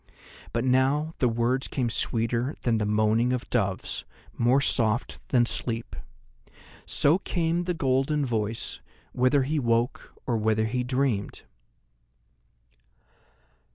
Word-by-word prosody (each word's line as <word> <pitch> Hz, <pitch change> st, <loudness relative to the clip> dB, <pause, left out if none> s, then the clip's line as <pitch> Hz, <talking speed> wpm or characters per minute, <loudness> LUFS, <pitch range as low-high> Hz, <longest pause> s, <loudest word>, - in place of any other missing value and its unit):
But 115 Hz, -, -1 dB
now 135 Hz, +5 st, +2 dB
the 125 Hz, -, +3 dB
words 120 Hz, +3 st, 0 dB
came 125 Hz, -4 st, -2 dB
sweeter 115 Hz, +4 st, 0 dB
than 115 Hz, -2 st, +2 dB
the 105 Hz, -, -1 dB
moaning 110 Hz, +3 st, +2 dB
of 125 Hz, -, -3 dB
doves, 100 Hz, -6 st, -1 dB, 0.3 s
more 120 Hz, +3 st, +3 dB
soft 115 Hz, -4 st, 0 dB
than 120 Hz, -2 st, +4 dB
sleep. 115 Hz, -1 st, -3 dB, 0.9 s
So 155 Hz, +6 st, +3 dB
came 170 Hz, -2 st, -1 dB
the 180 Hz, -1 st, -1 dB
golden 140 Hz, +1 st, +1 dB
voice, 110 Hz, -2 st, -2 dB, 0.3 s
whether 130 Hz, +2 st, +2 dB
he 150 Hz, +3 st, -1 dB
woke 120 Hz, 0 st, -1 dB
or 120 Hz, -3 st, 0 dB
whether 110 Hz, 0 st, +1 dB
he 125 Hz, +3 st, -1 dB
dreamed. 125 Hz, -5 st, -1 dB
125 Hz, 120 wpm, -26 LUFS, 115-135 Hz, 0.9 s, than